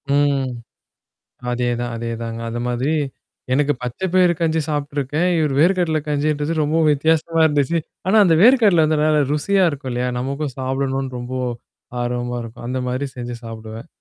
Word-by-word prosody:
ம். 140 Hz, -2 st, +2 dB, 1.0 s
அதேதான், 120 Hz, 0 st, -1 dB
அதேதாங்க. 115 Hz, 0 st, -4 dB
அது 120 Hz, +1 st, -4 dB
மாதிரி, 125 Hz, +6 st, 0 dB, 0.6 s
எனக்கு 145 Hz, +1 st, +2 dB
பச்சை 125 Hz, +10 st, -4 dB
பயரு 180 Hz, -2 st, +5 dB
கஞ்சி 160 Hz, -1 st, +2 dB
சாப்ட்டுருக்கேன். 145 Hz, +2 st, -1 dB
இவரு 150 Hz, -3 st, +1 dB
வேர்ககடல 170 Hz, -2 st, +3 dB
கஞ்சின்றது 150 Hz, +1 st, 0 dB
ரொம்பவும் 155 Hz, +1 st, +2 dB
வித்தியாசமா 160 Hz, +2 st, +1 dB
இருந்துச்சு. 145 Hz, +2 st, +1 dB, 0.3 s
ஆனா 205 Hz, -, +3 dB
அந்த 165 Hz, -2 st, +4 dB
வேர்க்கடல 215 Hz, -10 st, +6 dB
வந்து 155 Hz, -1 st, +1 dB
நல்லா 155 Hz, -1 st, +3 dB
ருசியா 190 Hz, +5 st, +2 dB
இருக்கும் 135 Hz, -2 st, -6 dB
இல்லையா? 125 Hz, +1 st, -1 dB
நமக்கும் 140 Hz, +1 st, -3 dB
சாப்பிடணும்ன்னு 135 Hz, 0 st, -2 dB
ரொம்போ 130 Hz, +1 st, -4 dB, 0.6 s
ஆர்வமா 120 Hz, 0 st, -2 dB
இருக்கும். 115 Hz, +1 st, -10 dB
அந்த 130 Hz, +1 st, -2 dB
மாரி 130 Hz, +3 st, -2 dB
செஞ்சு 120 Hz, 0 st, -5 dB
சாப்பிடுவேன். 110 Hz, +2 st, -8 dB
140 Hz, 140 wpm, -20 LUFS, 125-155 Hz, 1.0 s, வேர்க்கடல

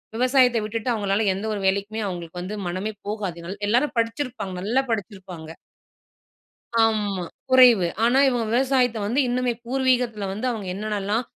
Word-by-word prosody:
விவசாயத்த 250 Hz, 0 st, +3 dB
விட்டுட்டு 225 Hz, +3 st, -3 dB
அவங்களால 205 Hz, 0 st, 0 dB
எந்த 195 Hz, +3 st, -5 dB
ஒரு 205 Hz, -, -3 dB
வேலைக்குமே 200 Hz, +3 st, -1 dB
அவங்களுக்கு 175 Hz, -2 st, -6 dB
வந்து 190 Hz, +4 st, -5 dB
மனமே 185 Hz, +5 st, -3 dB, 0.2 s
போகாதுனால 190 Hz, -4 st, -4 dB
எல்லாரும் 255 Hz, +6 st, +2 dB
படிச்சிருப்பாங்க 230 Hz, -4 st, -2 dB
நல்லா 235 Hz, +8 st, +1 dB
படிச்சிருப்பாங்க. 190 Hz, -6 st, -5 dB, 1.3 s
ஆமா, 210 Hz, -4 st, +1 dB, 0.3 s
குறைவு. 245 Hz, -8 st, +6 dB, 0.2 s
ஆனா 250 Hz, +3 st, +4 dB
இவங்க 240 Hz, -3 st, -1 dB
விவசாயத்த 250 Hz, -1 st, +2 dB
வந்து 235 Hz, +7 st, 0 dB
இன்னுமே 245 Hz, 0 st, 0 dB
பூர்வீகத்தில 250 Hz, -4 st, 0 dB
வந்து 215 Hz, +6 st, -4 dB
அவங்க 220 Hz, -5 st, -4 dB
என்னென்னலாம் 210 Hz, +2 st, -2 dB
220 Hz, 130 wpm, -23 LUFS, 195-245 Hz, 1.3 s, குறைவு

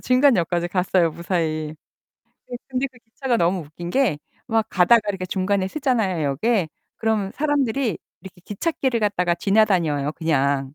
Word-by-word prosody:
중간역까지 210 Hz, -, +2 dB
갔어요, 180 Hz, -2 st, +2 dB
무사히. 160 Hz, -3 st, -2 dB, 0.7 s
네. 245 Hz, -, -5 dB
근데 260 Hz, +1 st, -1 dB
그 245 Hz, -, -18 dB
기차가 240 Hz, +2 st, -2 dB
너무 175 Hz, -1 st, +1 dB
웃긴 165 Hz, +3 st, -8 dB
게 240 Hz, -, +1 dB, 0.3 s
막 225 Hz, -2 st, +1 dB
가다가 195 Hz, +6 st, +5 dB
이렇게 195 Hz, -2 st, -2 dB
중간에 190 Hz, +1 st, 0 dB
서잖아요, 220 Hz, -, 0 dB
역에. 160 Hz, -, +1 dB, 0.3 s
그럼 220 Hz, -3 st, 0 dB
사람들이 275 Hz, -4 st, 0 dB, 0.2 s
이렇게 185 Hz, -2 st, -13 dB
기찻길을 255 Hz, -, -1 dB
갖다가 180 Hz, -5 st, +1 dB
지나다녀요 170 Hz, -7 st, +2 dB
그냥. 140 Hz, -4 st, 0 dB
190 Hz, 345 characters per minute, -22 LUFS, 170-235 Hz, 0.7 s, 가다가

